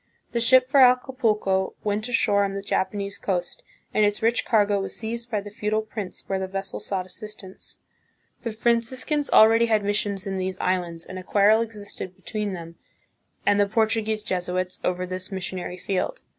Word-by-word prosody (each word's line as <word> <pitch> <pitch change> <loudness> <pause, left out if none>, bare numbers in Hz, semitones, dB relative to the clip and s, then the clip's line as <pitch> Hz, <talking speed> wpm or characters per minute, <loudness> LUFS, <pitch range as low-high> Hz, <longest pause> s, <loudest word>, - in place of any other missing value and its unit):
The 235 - 0
ship 255 +2 +6
for 275 +1 +4
Acapulco 240 -7 +3
went 215 +3 -1
ashore 205 -4 +3
on 195 -1 -1
the 195 0 -4
Japanese 200 +1 -2
coast 180 -3 -2 0.3
and 215 - +3
its 205 +1 +1
rich 230 +1 +2
cargo 205 -3 +3
was 195 - -2
seized 235 +1 -4
by 215 -3 -1
the 205 +1 -10
feudal 215 0 -1
prince 210 -4 -6
where 195 -1 -1
the 190 - -3
vessel 195 0 -4
sought 190 -2 -1
assist 210 +3 -6
ance. 190 0 -9 0.6
The 230 - -3
Franciscans 240 +6 0
already 225 +2 +6
had 215 -2 +2
missions 205 -1 -1
in 195 -1 -3
these 185 0 -3
islands, 175 -3 -1
and 185 0 -7
a - - -9
quarrel 210 +3 +4
existed 205 -4 -6
between 210 -1 -4
them 170 -2 -8 0.7
and 205 0 +4
the 205 - +4
Portuguese 220 0 +1
Jesuits 185 -2 -2
over 180 0 0
this 185 +2 -5
missionary 185 -1 -4
field. 195 - -2
205 Hz, 175 wpm, -25 LUFS, 190-225 Hz, 0.7 s, ship